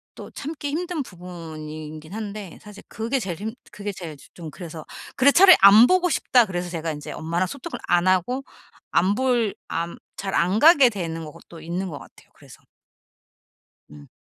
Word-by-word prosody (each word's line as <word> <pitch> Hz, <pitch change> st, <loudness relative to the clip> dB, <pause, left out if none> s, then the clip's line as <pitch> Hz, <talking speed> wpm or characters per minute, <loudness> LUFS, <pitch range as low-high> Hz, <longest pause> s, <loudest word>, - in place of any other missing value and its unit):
또 -, -, -10 dB
참기 290 Hz, 0 st, -6 dB
힘든 340 Hz, +1 st, -3 dB
부분이긴 160 Hz, -, -9 dB
한데 205 Hz, -4 st, -7 dB
사실 210 Hz, -1 st, -13 dB
그게 235 Hz, +5 st, -2 dB
제일 175 Hz, -5 st, -4 dB
힘 220 Hz, +2 st, -4 dB, 0.2 s
그게 205 Hz, 0 st, -5 dB
제일 165 Hz, -5 st, -8 dB
즈 -, -, -17 dB
좀 165 Hz, -3 st, -9 dB
그래서. 165 Hz, -3 st, -9 dB, 0.3 s
'그래 280 Hz, +2 st, +5 dB
차라리 370 Hz, +3 st, +8 dB
안 210 Hz, +4 st, +9 dB
보고 365 Hz, -1 st, +3 dB
싶다.' 245 Hz, -6 st, +3 dB
그래서 175 Hz, -2 st, -4 dB
제가 165 Hz, -1 st, -3 dB
인제 150 Hz, -1 st, -7 dB
엄마랑 170 Hz, +3 st, -2 dB
소통을 280 Hz, -, -7 dB
안 175 Hz, +1 st, +2 dB
하고 215 Hz, +9 st, +1 dB, 0.5 s
안 190 Hz, +3 st, +2 dB
볼 240 Hz, -4 st, +1 dB
안 170 Hz, +1 st, -3 dB, 0.2 s
잘 195 Hz, -1 st, -4 dB
안 185 Hz, +5 st, +2 dB
가게 295 Hz, -5 st, +7 dB
되는 165 Hz, -6 st, -5 dB
것도 155 Hz, +2 st, -13 dB
있는 175 Hz, +4 st, -4 dB
것 145 Hz, -4 st, -7 dB
같아요 -, -, -17 dB
그래서. -, -, -17 dB, 1.3 s
음. 75 Hz, -1 st, -13 dB
185 Hz, 315 characters per minute, -23 LUFS, 165-245 Hz, 1.3 s, 안